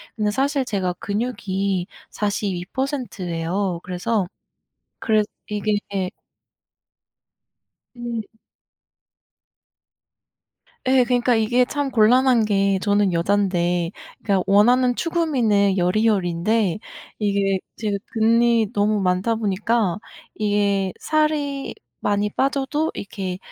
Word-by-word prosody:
근데 210 -2 0
사실 275 +4 +1
제가 190 -5 -1
근육이 200 -4 -2 0.2
42% 210 +4 -3
예요. 175 +2 -2
그래서 190 +3 -1 0.7
그래 215 -1 +2 0.3
이게 210 0 0 2.2
음. 235 -2 -4 2.6
예. 260 -1 +5
그러니까 245 0 +2
이게 235 +3 +3
참 285 +1 -2
곤란한 245 +1 +4
게 195 -2 +2
저는 205 -2 +2
여잔데 175 -1 +1 0.3
그냥 195 -3 +2
원하는 245 +5 +4
추구미는 240 - +1
여리여리인데 190 0 +1 0.4
이게 200 -2 +1 0.2
제가 210 -2 -1 0.2
근이 230 0 +3
너무 210 0 +1
많다 185 +4 +1
보니까 210 -2 0 0.4
이게 200 -2 +1
살이 300 -3 0 0.3
많이 205 0 0
빠져도 275 +5 0
이렇게 190 -2 -5
210 Hz, 195 characters per minute, -22 LUFS, 195-240 Hz, 2.6 s, 예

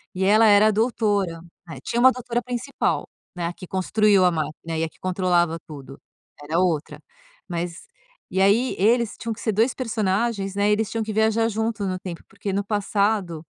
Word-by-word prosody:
E 190 - -1
ela 215 +3 +5
era 205 0 +6
a - - +4
doutora. 205 -6 0 0.3
Né, 160 - -8
tinha 235 - -2
uma 260 +2 +7
doutora 240 -1 -3
principal, 250 +2 -2 0.3
né, 175 -1 -3
a 175 - -4
que 185 - -11
construiu 195 +1 +3
a 180 - +4
máquina 160 0 -4
e 160 - 0
a 165 - -2
que - - -28
controlava 180 -3 +1
tudo, 140 -3 -10 0.4
era 160 +4 -1
outra. 165 -5 -1 0.5
Mas 175 - -5 0.4
e 190 - +1
aí 215 +6 +3
eles 230 +3 +2
tinham 230 - -4
que 220 - -13
ser 220 - -1
dois 230 +5 +2
personagens, 210 -3 -1
né, 200 +1 +2
eles 210 0 +1
tinham 225 - -2
que 215 0 -4
viajar 220 +1 +2
junto 220 -1 -2
no 185 -1 -2
tempo. 180 -2 -7
Porque 200 0 -5
no 200 +1 -1
passado, 200 -5 -1
200 Hz, 190 wpm, -23 LUFS, 180-220 Hz, 0.5 s, uma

